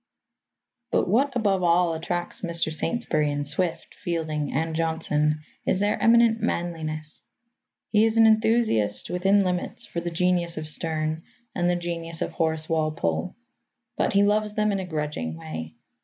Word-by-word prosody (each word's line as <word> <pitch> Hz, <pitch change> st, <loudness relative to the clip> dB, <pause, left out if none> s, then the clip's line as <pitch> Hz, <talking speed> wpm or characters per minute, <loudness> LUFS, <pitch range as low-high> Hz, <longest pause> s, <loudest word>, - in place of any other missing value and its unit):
But -, -, +1 dB
what, 255 Hz, +7 st, +2 dB
above 200 Hz, -5 st, +1 dB
all, 175 Hz, -1 st, +3 dB
attracts 175 Hz, +2 st, -3 dB
Mr. 170 Hz, -3 st, -1 dB
Saintsbury 155 Hz, -6 st, 0 dB
in 145 Hz, 0 st, -2 dB
Swift, 160 Hz, +4 st, -2 dB
Fielding 155 Hz, -4 st, -3 dB
and 160 Hz, +2 st, -1 dB
Johnson 155 Hz, -2 st, 0 dB, 0.2 s
is -, -, +1 dB
their 205 Hz, +1 st, 0 dB
eminent 230 Hz, -1 st, +5 dB
manliness. 155 Hz, -3 st, -3 dB, 0.7 s
He 215 Hz, 0 st, +4 dB
is 225 Hz, 0 st, +1 dB
an 225 Hz, -, +7 dB
enthusiast 220 Hz, -, +2 dB
within 195 Hz, +3 st, +3 dB
limits 180 Hz, -1 st, -2 dB
for 170 Hz, -, -4 dB
the 175 Hz, -, -3 dB
genius 175 Hz, 0 st, +1 dB
of 155 Hz, 0 st, -4 dB
Sterne 155 Hz, 0 st, 0 dB, 0.3 s
and 175 Hz, -1 st, +1 dB
the 175 Hz, -, +2 dB
genius 170 Hz, -1 st, -3 dB
of -, -, -4 dB
Horace 160 Hz, -1 st, -1 dB
Walpole. 155 Hz, -, -1 dB, 0.6 s
But -, -, 0 dB
he 200 Hz, 0 st, +5 dB
loves 210 Hz, +1 st, +1 dB
them 210 Hz, 0 st, +1 dB
in 195 Hz, -, -1 dB
a 190 Hz, -, -4 dB
grudging 150 Hz, -, -3 dB
way. 80 Hz, 0 st, -7 dB
170 Hz, 155 wpm, -25 LUFS, 155-195 Hz, 0.7 s, an